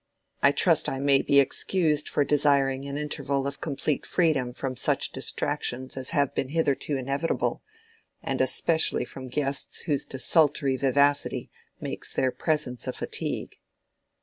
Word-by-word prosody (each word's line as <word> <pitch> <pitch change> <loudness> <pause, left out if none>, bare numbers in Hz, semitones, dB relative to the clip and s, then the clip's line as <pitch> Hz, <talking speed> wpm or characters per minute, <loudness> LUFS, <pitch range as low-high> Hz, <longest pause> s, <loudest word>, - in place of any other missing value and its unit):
I - - +6
trust - - +3
I 135 - -3
may 140 0 +3
be 140 - +4
excused 150 +1 +1
for 145 - +1
desiring 140 -2 +2
an 140 0 -4
interval 140 -2 -2
of 140 0 -4
complete 145 0 -2
freedom 150 -8 +1
from 130 +1 -4
such - - +1
distractions 130 +2 -1
as 130 -1 -3
have 145 -5 +1
been 130 - -2
hitherto 145 -2 0
inevitable, 140 +5 -1 0.6
and - - -1
especially 160 -1 +3
from 130 -1 -9
guests 140 +1 -3
whose 145 -5 -1
desultory 140 0 +2
vivacity 140 +2 +1 0.3
makes - - -5
their 130 - +1
presence 150 -7 -1
a - - -2
fatigue." - - -4
140 Hz, 140 wpm, -26 LUFS, 135-150 Hz, 0.6 s, I